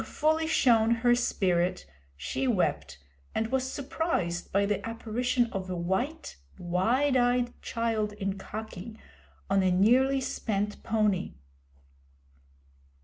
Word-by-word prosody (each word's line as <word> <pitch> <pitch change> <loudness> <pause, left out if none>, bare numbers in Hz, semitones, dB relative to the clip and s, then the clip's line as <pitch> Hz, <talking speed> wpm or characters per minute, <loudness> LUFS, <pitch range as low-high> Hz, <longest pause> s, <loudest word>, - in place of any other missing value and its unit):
Having - - -10
fully 315 +1 +1
shown 230 -7 +4
her 240 - +6
spirit, 180 - 0 0.3
she 80 - -2
wept, 200 - 0 0.4
and 225 +1 -1
was 260 0 0
surprised 275 - -2
by 200 +1 +2
the 205 0 -1
apparition 235 +2 0
of 190 -1 -4
a 180 - -2
white, 215 - -2 0.2
wide 230 +11 +1
eyed 245 -1 +2
child 225 -2 -1
in 195 -2 -3
khaki, 215 +1 -8 0.5
on 195 0 +2
a 185 - +3
nearly 250 +9 +4
spent 210 -5 -2
pony. 210 -4 0
220 Hz, 120 wpm, -28 LUFS, 190-250 Hz, 0.5 s, her